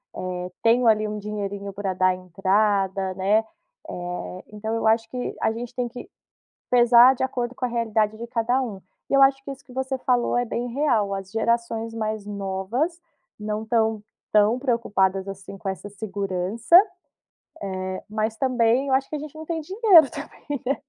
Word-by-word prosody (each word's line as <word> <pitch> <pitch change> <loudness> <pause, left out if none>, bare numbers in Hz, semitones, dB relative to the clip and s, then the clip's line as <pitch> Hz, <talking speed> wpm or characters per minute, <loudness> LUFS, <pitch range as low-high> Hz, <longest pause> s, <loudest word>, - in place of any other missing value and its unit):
Eh, 180 0 -4
tenho, 235 +1 +4
ali, 215 -1 +4
um 210 0 -4
dinheirinho 200 -1 -5
pra 195 -1 -3
dar 185 0 +2
entrada", 190 +1 0
né, 200 +3 +3 0.5
eh, 180 +1 -6
então 220 +1 -4
eu 225 -1 0
acho 225 0 +2
que 250 0 -4
a - - +2
gente 235 +2 -6
tem 245 -1 -1
que 250 - -10 0.6
pesar 245 +1 +7
de 260 - -2
acordo 250 -1 -2
com 250 - -2
a - - 0
realidade 220 -3 0
de 235 +1 -7
cada 240 +3 +1
um 215 -6 -5 0.3
e - - -3
eu 275 - +5
acho 270 0 +3
que 280 - -9
isso 275 +1 -11
que 250 - -14
você 265 0 -2
falou 245 -1 +1
é 245 - +1
bem 235 +1 -3
real, 235 -6 +1
as 195 0 -7
gerações 230 0 -1
mais 215 -2 -3
novas 205 - -2 0.4
não 210 0 -3
estão 220 -2 0 0.3
tão 215 +4 +4
preocupadas 200 -7 0
assim 195 0 -8
com 195 - -8
essa 190 +2 -6
segurança, 200 - -1 1.1
eh, 185 0 -5
mas 215 +1 -1
também, 255 0 +2
eu 265 - +1
acho 265 0 +1
que - - -4
a 295 - -3
gente 300 0 -8
não 315 0 -8
tem 325 -1 -3
dinheiro 375 - +5
também, 290 -2 -6
né. 270 +3 +1
225 Hz, 180 wpm, -24 LUFS, 200-250 Hz, 1.1 s, pesar